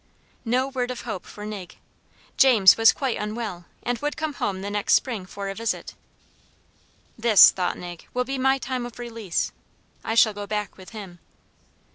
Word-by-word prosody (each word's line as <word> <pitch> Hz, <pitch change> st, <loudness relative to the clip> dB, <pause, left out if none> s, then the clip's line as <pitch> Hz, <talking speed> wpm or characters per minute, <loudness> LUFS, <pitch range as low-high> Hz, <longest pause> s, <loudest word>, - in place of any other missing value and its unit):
No 250 Hz, +3 st, +1 dB
word 255 Hz, -2 st, -2 dB
of 250 Hz, -, -5 dB
hope 215 Hz, -6 st, -6 dB
for 210 Hz, -, -9 dB
Nig. 205 Hz, -4 st, -7 dB, 0.6 s
James 230 Hz, -8 st, +7 dB
was 225 Hz, 0 st, +6 dB
quite 265 Hz, -4 st, -2 dB
unwell, 210 Hz, -4 st, -5 dB, 0.2 s
and 245 Hz, -1 st, -2 dB
would 295 Hz, 0 st, -3 dB
come 310 Hz, -1 st, -2 dB
home 190 Hz, -7 st, -3 dB
the 200 Hz, -, -4 dB
next 205 Hz, 0 st, +2 dB
spring 220 Hz, -8 st, -1 dB
for 200 Hz, +1 st, -6 dB
a 195 Hz, -, -3 dB
visit. 230 Hz, +2 st, -3 dB, 1.3 s
This, 225 Hz, -3 st, +8 dB
thought 180 Hz, -2 st, -2 dB
Nig, 175 Hz, -1 st, -9 dB
will 250 Hz, -, 0 dB
be 270 Hz, +1 st, -3 dB
my 265 Hz, +1 st, +3 dB
time 255 Hz, -1 st, -4 dB
of 240 Hz, -, -13 dB
release. 230 Hz, -7 st, -3 dB, 0.5 s
I 225 Hz, -, -2 dB
shall 220 Hz, -2 st, +5 dB
go 205 Hz, 0 st, -7 dB
back 210 Hz, -1 st, -3 dB
with 185 Hz, -1 st, -13 dB
him. 195 Hz, -6 st, -10 dB
225 Hz, 175 wpm, -24 LUFS, 200-245 Hz, 1.3 s, This